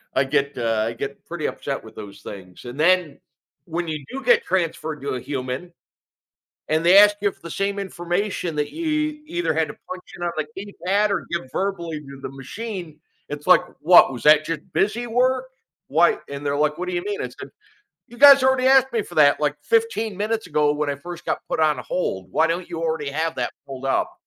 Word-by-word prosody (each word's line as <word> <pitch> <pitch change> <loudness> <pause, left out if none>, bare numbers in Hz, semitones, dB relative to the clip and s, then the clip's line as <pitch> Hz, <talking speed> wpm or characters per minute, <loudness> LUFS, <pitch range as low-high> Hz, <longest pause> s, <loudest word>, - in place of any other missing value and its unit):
I 130 - +4
get, 140 +1 0
uh, 115 -2 0
I 115 - -3
get 135 +4 -6
pretty 170 -3 -3
upset 140 -1 -4
with 110 - -13
those 100 -2 -10
things. 95 +1 -10
And 120 +4 -8
then 175 -3 +3 0.5
when 170 0 -3
you 155 -3 -4
do 270 +1 -6
get 475 -1 +4
transferred 160 -4 -2
to 140 - -4
a 130 - -2
human 135 +6 -5 1.0
and 160 +2 +1
they 180 +3 +7
ask 205 0 +8
you 200 -1 +2
for - - -27
the 170 -1 -8
same 200 0 -1
information 180 -1 -2
that 150 - -1
you 305 -2 -1
either 170 - -1
had 160 0 +1
to - - -8
punch 185 0 -6
in 175 - -6
on 170 - 0
the 155 - 0
keypad 200 +1 0
or 200 - -1
give 170 -6 -3
verbally 170 -5 -2
to 140 -1 -11
the - - -5
machine, 165 - -7 0.3
it's 145 +2 -7
like, 180 -1 +7 0.2
"What, 175 -4 +7
was 120 - -7
that 155 0 +6
just 165 -2 -3
busy 235 +4 0
work?" 255 +2 +1 0.4
Why, 170 +3 +4
and 140 +1 -6
they're 140 - 0
like, 150 0 +1
"What 180 +1 -4
do 180 - -3
you 175 - -2
mean?" 205 -1 -3
I - - -2
said, - - -10 0.6
"You 240 - -14
guys 280 -1 +9
already 260 -1 +3
asked 265 -1 +5
me 230 -2 +1
for 175 - -12
that, 145 -1 +5
like, 145 0 0
15 225 +1 0
minutes 215 +2 -2
ago 150 -1 +2
when 150 0 -2
I - - -1
first 175 +4 -9
got - - -1
put - - -2
on 155 -2 +3
hold. 95 - -3
Why 160 +3 +3
don't 170 +1 -2
you 165 - -4
already 160 -3 -1
have 160 +3 -1
that 120 -1 -2
pulled 135 -1 -7
up?" 135 - 0
165 Hz, 220 wpm, -23 LUFS, 145-200 Hz, 1.0 s, guys